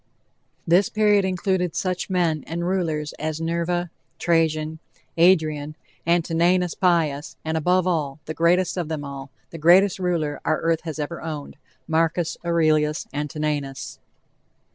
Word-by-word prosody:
This 175 +4 +4
period 210 -2 +3
included 185 -2 -1
such 185 0 -2
men 170 -5 +1
and 170 +1 -3
rulers 160 -5 -1
as 155 +1 -3
Nerva, 170 +1 -1 0.3
Trajan, 160 -2 +1 0.4
Adrian, 155 -4 +3 0.3
Antoninus 170 +1 +2
Pius, 160 -5 +1
and 160 0 -1
above 180 +3 +2
all, 155 -5 -1
the 155 - -4
greatest 175 +3 +2
of 175 -3 -2
them 155 -2 -4
all 140 0 -7 0.2
the 165 - -8
greatest 185 +5 +5
ruler 170 -5 -1
our 155 - +1
earth 165 -1 +1
has 160 -2 -4
ever 155 +3 -4
owned 155 -3 -6 0.3
Marcus 165 +1 +1
Aurelius 155 -3 +2
Antoninus. 145 -1 -3
165 Hz, 130 wpm, -23 LUFS, 155-180 Hz, 0.4 s, greatest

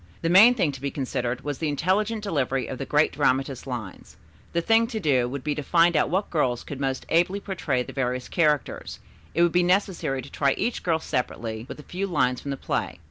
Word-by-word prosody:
The 165 - +1
main 215 +8 +8
thing 175 -10 +1
to 135 -2 -10
be 140 - -1
considered 125 -3 -3
was 145 -2 -4
the 160 - -1
intelligent 205 +8 0
delivery 135 - -1
of 130 - -6
the 135 - -4
great 150 +1 +3
dramatist's 135 -2 0
lines. 115 -7 -7 0.3
The 170 - +1
thing 225 +6 +3
to 225 -2 -4
do 130 - +2
would 135 0 -5
be 150 - 0
to 150 - -4
find 170 +3 +3
out 150 - +2
what 190 +5 -1
girls 125 -7 0
could 140 - -7
most 135 -1 -2
ably 175 +4 +2
portray 160 -11 -2
the - - -10
various 125 -1 -2
characters, 150 -5 0 0.4
it 170 - +4
would 175 - +3
be 180 - +3
necessary 180 -7 0
to - - -12
try 140 -2 +2
each 240 - -1
girl 165 -2 +1
separately 115 -5 -3
with - - -8
a - - -10
few 190 +5 -4
lines 125 -8 +1
from 140 - -6
the 140 - -2
play. - - -3
150 Hz, 225 wpm, -25 LUFS, 130-180 Hz, 0.4 s, main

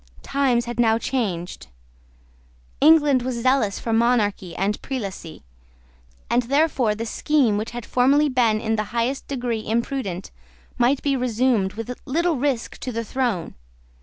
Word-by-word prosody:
Times 255 -4 +1
had 240 0 -6
now 225 -1 +4
changed: 200 -9 -3 1.1
England 295 -3 +5
was 240 -2 -3
zealous 255 -6 +2
for 225 - -3
monarchy 215 -6 +1
and 200 +3 -1
prelacy; 200 - -6 0.8
and 240 +2 +2
therefore 265 -3 +1
the 225 +2 -4
scheme 260 -2 +1
which 215 +2 -2
had 240 -1 -7
formerly 275 +4 +3
been 235 -5 +2
in 220 0 -1
the 215 - -1
highest 250 +4 -1
degree 245 -5 -2
imprudent 225 -5 -3 0.5
might 255 +3 +2
be 280 -1 +1
resumed 240 -5 +1
with 225 +3 -5
little 335 +3 +1
risk 260 -3 -2
to 255 - -4
the 230 0 -3
throne. 235 -8 -2
240 Hz, 140 wpm, -23 LUFS, 220-265 Hz, 1.1 s, England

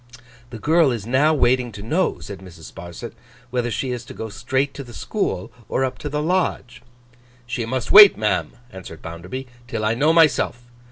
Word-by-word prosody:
'The 120 - -8
girl 160 +5 +3
is 115 -4 -4
now 135 +6 +3
waiting 125 -4 +2
to 100 -1 -9
know,' 165 +12 0
said 100 -2 -9
Mrs. 90 -4 -12
Sparsit, 85 +7 -9 0.4
'whether 120 -1 -1
she 125 +3 -2
is 120 -1 -4
to - - -11
go 110 - -6
straight 130 +5 -1
to 140 - -7
the 120 -2 -12
school, 95 - -3 0.2
or 135 - +1
up 130 - -5
to 145 - -4
the 150 +1 -2
Lodge.' 155 -8 -1 0.6
'She 120 -2 -3
must 130 0 -2
wait, 205 -1 +10
ma'am,' 105 0 0 0.2
answered 95 -4 -10
Bounderby, 90 +11 -7 0.2
'till 110 -2 -3
I 110 - +2
know 145 +7 +3
myself. 155 -6 +3
125 Hz, 185 wpm, -22 LUFS, 110-145 Hz, 0.6 s, wait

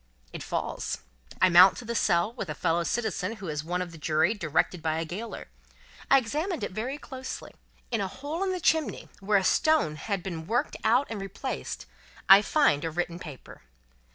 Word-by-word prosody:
It - - -6
falls. - - -3 0.5
I 185 - +7
mount 180 +2 +8
to 245 - -8
the 235 - -3
cell, 190 -1 +2
with 215 -8 -5
a 155 - -3
fellow 165 +3 +1
citizen 220 0 -2
who 195 -4 -8
is 150 -1 -3
one 180 +3 -1
of 175 - -9
the 165 - -12
Jury, 160 +5 +2
directed 175 -2 0
by 160 0 0
a 165 - -2
gaoler. 200 +8 -6 0.6
I 275 - +7
examine 295 - -2
it, - - -3
very 240 +8 -3
closely. 260 -3 -8 0.4
In 230 -3 0
a 195 - -1
hole 290 - -5
in 385 - 0
the 365 - -2
chimney, 320 -2 0
where 200 +1 +2
a 190 - +1
stone 305 - +2
has 200 +2 -3
been 165 -3 -6
worked 240 +2 0
out 240 +5 +4
and 210 -3 -4
replaced, 195 +7 -5 0.4
I 195 +1 +10
find 245 - +2
a 165 - -1
written 175 +1 -3
paper. 150 -7 -11
195 Hz, 195 wpm, -28 LUFS, 170-245 Hz, 0.6 s, I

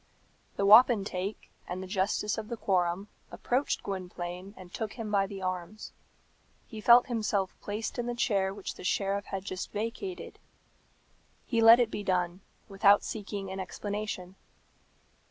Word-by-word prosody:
The 200 - 0
wapentake 205 -3 +4 0.2
and 180 +1 -4
the - - -7
justice 200 +2 0
of 215 - -7
the 235 0 -5
quorum 185 -1 0 0.2
approached 255 +4 -1
Gwynplaine 185 0 -6
and 185 -1 -12
took 220 -3 -4
him 225 -4 -6
by 195 -1 +2
the 195 -1 -7
arms. 185 +3 -5 0.7
He 220 -2 -9
felt 240 +3 +7
himself 215 -6 -1
placed 215 +4 -4
in 240 - -2
the 240 - -2
chair 200 -5 +1
which 195 0 -6
the - - -12
sheriff 200 +2 0
had 195 -1 -5
just 185 -2 -5
vacated. 230 - -5 1.1
He 230 -2 0
let 225 +2 +9
it 235 -2 +2
be 205 - -4
done, 180 -1 0 0.3
without 200 +1 +4
seeking 200 -2 -5
an 190 - -5
explanation. 195 -1 -5
200 Hz, 150 wpm, -29 LUFS, 190-220 Hz, 1.1 s, let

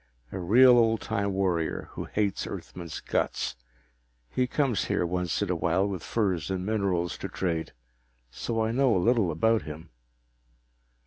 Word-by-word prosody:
A - - -4
real 120 +7 +6
old 115 -1 +3
time 100 0 -1
warrior 90 -4 -1
who - - -6
hates 105 -2 -1
Earthmen's 85 -3 -7
guts. - - -1 0.8
He 125 - +1
comes 130 -5 0
here - - 0
once 90 +2 -1
in 95 - -1
a - - +1
while 85 +4 +1
with 95 -4 -4
furs 95 -8 -1
and 95 -1 -2
minerals 95 -5 -1
to - - -5
trade, 85 -3 -2 0.6
so 115 - -2
I 110 - 0
know 130 -1 +3
a - - +3
little 110 0 +3
about 110 +8 +2
him." 80 +1 -9
95 Hz, 155 wpm, -27 LUFS, 85-115 Hz, 0.8 s, real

